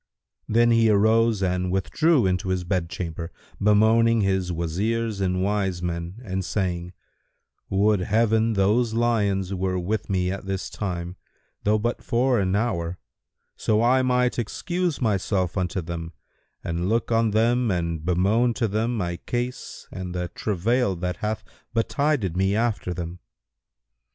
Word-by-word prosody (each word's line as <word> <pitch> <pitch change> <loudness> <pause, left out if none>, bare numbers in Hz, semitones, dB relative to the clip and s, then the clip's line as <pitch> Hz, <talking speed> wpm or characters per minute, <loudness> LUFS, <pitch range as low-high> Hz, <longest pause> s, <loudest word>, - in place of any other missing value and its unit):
Then 120 +2 +4
he 115 -1 +4
arose 110 0 +3
and 90 0 0
withdrew 130 - +2
into 90 0 0
his 95 -1 0
bedchamber, 85 -2 -3 0.3
bemoaning 110 +2 +4
his 95 -2 0
Wazirs 100 +6 -1
and 90 -1 0
wise 95 -3 -1
men 85 +3 -4
and 95 -1 -2
saying, 90 -2 -2 0.8
"Would 100 +1 +3
Heaven 110 +3 +2
those 110 +4 +2
lions 100 -5 +1
were 95 0 -1
with 100 +6 -2
me 90 -2 +1
at 95 0 -6
this 95 -1 -3
time, 90 -2 -4 0.5
though 105 +1 +4
but 120 +3 -2
for 125 0 +2
an 95 -1 +1
hour; 90 -6 -1 0.6
so 110 +1 +1
I 130 +2 +4
might 125 -1 +1
excuse 175 - -2
myself 100 -5 0
unto 95 -1 -1
them 85 0 -6 0.5
and 85 +2 -2
look 115 +2 0
on 115 0 +3
them 115 +3 +2
and 85 -4 -1
bemoan 100 +8 +2
to 115 - 0
them 110 +4 -1
my 85 -4 -2
case 120 +6 -5
and 90 -1 -6
the 90 -1 -2
travail 105 +4 0
that 90 +1 -3
hath 105 0 -3 0.3
betided 120 - 0
me 95 +2 +2
after 110 -5 0
them!" 85 0 -5
100 Hz, 140 wpm, -24 LUFS, 90-115 Hz, 0.8 s, Then